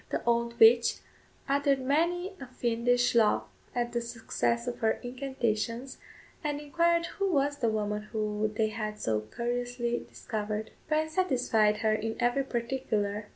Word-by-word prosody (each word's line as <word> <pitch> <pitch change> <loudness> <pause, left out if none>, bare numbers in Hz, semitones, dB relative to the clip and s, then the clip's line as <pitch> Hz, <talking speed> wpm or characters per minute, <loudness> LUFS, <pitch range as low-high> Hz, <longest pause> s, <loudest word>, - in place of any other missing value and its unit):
The - - -2
old 235 0 +1
witch 235 +1 +6 0.5
uttered 280 0 +2
many 340 +8 +1
a 270 - -6
fiendish 245 0 +1
laugh 225 -3 +4 0.3
at 240 -1 0
the 235 0 -1
success 235 0 -1
of 245 -1 -4
her 220 -1 +3
incantations, 245 -1 -2 0.4
and 295 -1 -1
inquired 335 +3 +2
who 395 +2 -1
was 285 -2 +1
the 235 -5 +1
woman 210 -1 -2
whom 215 0 -1
they 220 0 +2
had 215 -1 -4
so 110 -1 0
curiously 240 - -2
discovered. 215 0 -4 0.2
Bryan 310 0 +1
satisfied 250 - +2
her 215 - +4
in 225 +1 -2
every 245 +3 +2
particular. 225 -5 -2
240 Hz, 145 wpm, -29 LUFS, 220-275 Hz, 0.5 s, witch